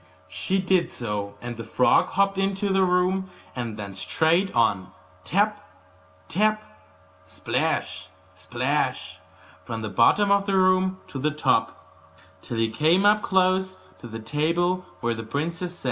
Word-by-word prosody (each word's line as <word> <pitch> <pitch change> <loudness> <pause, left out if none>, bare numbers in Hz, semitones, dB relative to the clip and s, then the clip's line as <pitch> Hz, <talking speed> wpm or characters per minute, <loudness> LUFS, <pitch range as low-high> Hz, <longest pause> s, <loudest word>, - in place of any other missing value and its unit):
She 195 - -1
did 185 -2 +1
so, 105 -3 -4
and 120 -1 -6
the 115 - -6
frog 125 - +3
hopped 195 0 +1
into 195 0 0
the 190 - +3
room, 185 +1 +1 0.3
and 120 -4 -4
then 100 -2 -7
straight 165 - +1
on 100 -5 +2 0.3
tap, 205 +3 0 0.6
tap 215 +1 +1 0.8
plash, - - -1 0.4
plash - - -1 0.4
from 115 -2 -5
the 110 - -3
bottom 120 - +3
of 200 0 +2
the 195 - +1
room 185 0 +2
to 135 - -6
the 150 +3 +1
top, 150 0 0 0.6
till 115 - -6
he 115 0 +1
came 160 - +3
up 210 +1 +5
close 190 0 +1 0.2
to 120 - -10
the 115 -1 -7
table 170 +9 -1
where 120 0 0
the 115 - -6
princess 165 +9 -4
sat. - - -15
180 Hz, 145 wpm, -24 LUFS, 120-190 Hz, 0.8 s, up